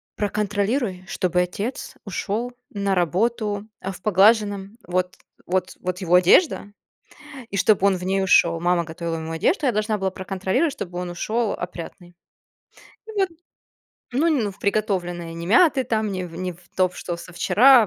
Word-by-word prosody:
"Проконтролируй, 205 0 -1
чтобы 180 -1 +1
отец 200 +8 -4
ушёл 215 +5 -2 0.2
на 200 -1 -1
работу 205 +4 0
в 190 -1 -6
поглаженном, 205 +1 +3
вот 180 +1 -1 0.3
вот 185 0 -1
вот 180 +1 -3
его 180 -1 +3
одежда, 205 - +4 0.8
и 200 - -3
чтобы 200 0 +4
он 190 -2 +2
в 180 - -8
ней 195 +1 +1
ушёл." 170 -3 +4
Мама 175 -1 +2
готовила 165 +1 -4
ему 160 0 -5
одежду, 285 - +1
я 255 - +4
должна 215 0 0
была 190 -1 -1
проконтролировать, 190 - -1
чтобы 180 -10 -6
он 180 -1 -4
ушел 215 +5 -1
опрятный. 175 0 -8 0.9
И - - -7
ладно. 360 -4 0 0.8
Ну 295 +7 +2
ну, 240 -10 +1
в 190 - -15
приготовленной, 175 -5 -1
не 170 0 -6
мятый 270 - +5
там, 220 -3 0
не 185 -1 -3
в 165 -1 -9
не 185 0 -3
в 175 - -19 0.2
то, 185 -1 +3
что 175 -1 -5
в 170 - -10
со 180 - -11
вчера, 240 +5 +6
195 Hz, 165 wpm, -23 LUFS, 180-215 Hz, 0.9 s, вчера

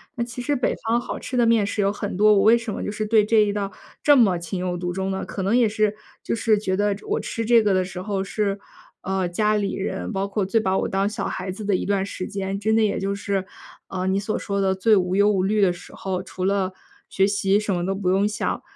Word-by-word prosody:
那 235 - -1
其 240 +1 -7
实 290 +4 -1
北 250 - 0
方 230 +1 +2
好 240 - -5
吃 255 - -5
的 240 - +4
面 230 -3 +3
食 205 +1 -2
有 195 - +2
很 205 -2 -5
多， 210 +1 +6
我 200 - +4
为 225 +2 +6
什 230 -2 -5
么 - - -4
就 - - -3
是 215 +1 -3
对 215 -1 +4
这 225 +1 +2
一 210 -1 +4
道 200 -1 -3 0.3
这 290 - +6
么 200 -8 +4
情 175 +2 -5
有 180 -1 -2
独 175 0 -3
钟 190 +1 -2
呢？ 190 0 -3
可 195 - -5
能 195 +5 +1
也 240 -3 +4
是 215 -1 0 0.3
就 - - -2
是 225 -1 +2
觉 190 -2 -1
得 205 +1 +1
我 - - 0
吃 230 - -4
这 230 0 +5
个 205 -2 +2
的 185 -1 +2
时 180 0 -7
候 195 0 -2
是， 200 0 -2 0.4
呃， 190 -1 -1
家 210 +4 +1
里 205 -2 -1
人 195 +3 -3
包 195 -1 -1
括 200 0 -1
最 225 +4 +2
把 190 -3 0
我 - - -1
当 195 +1 +1
小 210 - -3
孩 185 +1 -4
子 190 +4 -6
的 205 0 0
一 - - -4
段 195 -1 0
时 185 -2 -5
间。 195 0 -3
真 220 +2 +1
的 225 - +4
也 210 - 0
就 195 +1 -2
是， 200 -1 -2 0.4
呃， 185 -1 -3
你 190 +1 +1
所 215 +2 -2
说 200 -1 -3
的 190 -1 +1
最 215 +3 +4
无 180 0 0
忧 205 +1 +4
无 190 -2 +1
虑 210 +2 +1
的 190 -2 +4
时 175 0 -11
候， 185 -1 -3
除 185 0 -7
了 190 -1 0 0.3
学 195 - +2
习 200 0 +2
什 210 -1 -1
么 175 -1 -1
都 195 +1 -1
不 190 -2 -1
用 195 +2 +3
想。 210 +1 -2
200 Hz, 295 characters per minute, -23 LUFS, 190-215 Hz, 0.4 s, 多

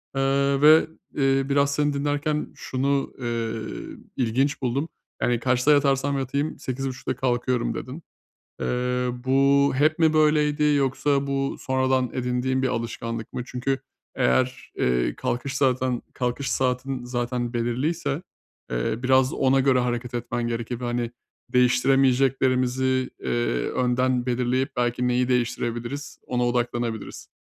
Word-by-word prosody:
Eee, 140 0 +2
ve, 155 +2 +7 0.3
eee 135 0 +2
biraz 140 0 +2
seni 145 0 +1
dinlerken 145 +1 -1
şunu, 135 +1 -1
eee, 115 -2 -2 0.6
ilginç 130 +3 0
buldum. 135 +5 -1 0.3
Yani, 120 -1 +2
"Kaçta 125 +3 +2
yatarsam 140 -1 +2
yatayım 140 +3 -2
8.30'da 130 0 -3
kalkıyorum." 125 -1 0
dedin. 140 +6 -7 0.6
Eee, - - -1 0.6
bu 140 +1 +4
hep 155 +4 +2
mi 160 -1 +4
böyleydi 150 -1 +3
yoksa 140 -1 +2
bu 135 0 -1
sonradan 130 -1 +1
edindiğin 130 +1 -1
bir 130 - +2
alışkanlık 115 -1 -4
mı? 125 - -3
Çünkü 130 +2 -2 0.4
eğer, 130 - 0
eee, 60 0 +1
kalkış 135 +3 -2
zaten 130 -2 +1
kalkış 125 +2 -2
saatin 130 0 -1
zaten 120 0 -2
belirliyse, 135 +6 -1 0.5
eee, - - -1
biraz 130 0 +3
ona 135 0 +3
göre 130 -1 +3
hareket 120 0 -2
etmen 120 0 -2
gerekir 120 +1 -3
ve, - - -4
hani, 120 -1 -1 0.4
değiştiremeyeceklerimizi, 130 0 +2
eee, 120 - -1
önden 125 0 +1
belirleyip 125 +2 0
belki 120 0 0
neyi 125 0 +1
değiştirebiliriz 120 +3 -2
ona 125 -1 0
odaklanabiliriz. 120 -2 -2
130 Hz, 125 wpm, -24 LUFS, 120-140 Hz, 0.6 s, ve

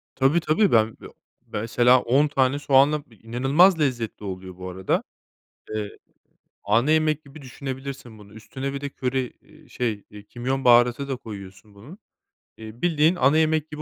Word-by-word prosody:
Tabii, 135 +6 +3
tabii. 170 +6 +2
Ben, 110 -1 +2
ya, - - -9 0.4
mesela 120 +3 +2
10 140 +5 +2
tane 135 0 +1
soğanla 145 +1 +3
bi 115 - -19
inanılmaz 135 - +3
lezzetli 120 -7 -2
oluyor 95 -1 -7
bu 90 0 -7
arada. 95 +1 -1 0.7
Eee, 105 -1 -5 0.7
ana 115 +9 +2
yemek 155 -1 +1
gibi 140 +2 -14
düşünebilirsin 135 -3 -8
bunu. 105 0 -16
Üstüne 135 +5 -6
bir 140 - -5
de 145 - -4
köri, 130 -1 -3
eee, 155 -1 -21
şey, 115 -5 -3
eee, 105 -1 -12
kimyon 130 +4 -4
baharatı 120 +3 +4
da 135 - -2
koyuyorsun 100 -2 -11
bunun, 130 - -13 0.6
eee, 110 +2 -11
bildiğin 165 0 +3
ana 140 +1 +3
yemek 155 -1 +1
gibi 150 0 -7
130 Hz, 160 wpm, -24 LUFS, 110-145 Hz, 0.7 s, baharatı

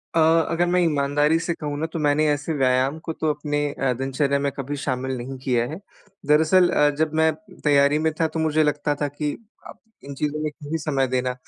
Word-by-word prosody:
अ - - +4 0.3
अगर 170 +1 +1
मैं 180 +1 +2
ईमानदारी 150 0 +2
से 170 +1 -2
कहूँ 145 -3 -5
न - - 0
तो 165 - -3
मैंने 150 +1 +2
ऐसे 150 +3 -3
व्यायाम 130 +3 +2
को 160 - -3
तो 155 - -2
अपने 145 0 -3
अ, 135 -2 -1
दिनचर्या 135 +2 -1
में 140 0 -1
कभी 140 +2 -4
शामिल 130 0 -2
नहीं 130 +2 -6
किया 120 -2 +1
है। 165 - -6 0.5
दरअसल 160 +4 +4
अ, 150 -3 +3
जब 160 -1 +1
मैं 160 0 +3 0.3
तैयारी 145 0 +4
में 160 0 +1
था 160 - +3
तो 160 - -5
मुझे 155 0 +2
लगता 150 0 0
था 145 - +1
कि 145 +1 -3 0.4
अब - - -12 0.2
इन 140 0 -8
चीज़ों 150 +1 -2
में 155 - -1
क्यों 145 0 -11
ही 165 - 0
समय 140 -4 0
देना? 125 0 -1
145 Hz, 220 wpm, -23 LUFS, 140-155 Hz, 0.5 s, अ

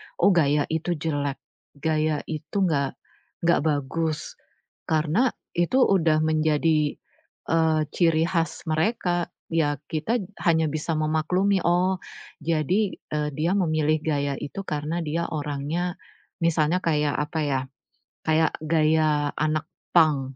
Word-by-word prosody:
Oh, - - +4
gaya 150 -4 +3
itu 160 +2 -1
jelek, 145 -3 -2 0.4
gaya 155 0 0
itu 155 +5 -7
nggak 140 -6 0 0.5
nggak 170 0 +4
bagus". 155 +2 -2 0.5
Karena, 160 - +2 0.3
itu 175 +10 +3
udah 165 -8 +3
menjadi, 155 -1 +2 0.6
eee, 160 -1 +3
ciri 165 -2 +3
khas 170 -3 -1
mereka. 175 +1 0 0.2
Ya, 145 -3 +2
kita 165 +9 0 0.3
hanya 160 -2 +4
bisa 155 +2 -2
memaklumi, 170 +6 +1
"Oh, 180 +2 +2 0.5
jadi, 170 +6 +1 0.2
eee, 150 -1 -1
dia 160 +4 0
memilih 155 -4 +2
gaya 145 -2 0
itu 195 - -5
karena 155 +2 -2
dia 165 +2 -1
orangnya 150 +4 -2 0.5
misalnya 165 0 +2
kayak, 150 -3 +2
apa 150 +2 -2
ya, 135 -3 0 0.6
kayak 160 0 +3
gaya 155 -2 +2
anak 155 0 0 0.3
punk. 145 -6 +3
155 Hz, 120 wpm, -25 LUFS, 150-170 Hz, 0.6 s, Oh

